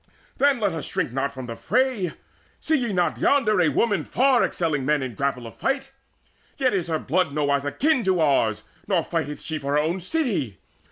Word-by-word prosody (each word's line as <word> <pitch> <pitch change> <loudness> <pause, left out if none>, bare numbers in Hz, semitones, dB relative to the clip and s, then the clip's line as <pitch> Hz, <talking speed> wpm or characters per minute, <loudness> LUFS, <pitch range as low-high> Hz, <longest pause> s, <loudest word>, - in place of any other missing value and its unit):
Then 280 -2 +3
let 200 -5 0
us 160 - -4
shrink - - -2
not 135 +2 -1
from 130 -2 -7
the 115 -1 -6
fray 245 - 0 0.5
See 315 - +1
ye 245 -6 0
not 180 -2 0
yonder 215 -9 +3
a 165 - +4
woman 200 - +1
far 260 - +3
excelling 155 -6 -1
Men 150 0 +1
in 130 - -4
the - - -15
grapple 135 -2 -2
of 115 - -10
fight? 270 0 -1 0.7
Yet 260 -4 +2
is 185 -4 -1
her 160 -1 0
blood 160 +1 0
Nowise 140 -1 +1
akin 265 - +1
to 185 -2 +2
ours, 135 -9 +2 0.2
nor - - +2
fighteth 150 +1 -3
she 155 -1 -4
For 140 0 -3
her - - +3
own 165 +5 0
city. 185 - -1
165 Hz, 205 wpm, -24 LUFS, -, 0.7 s, a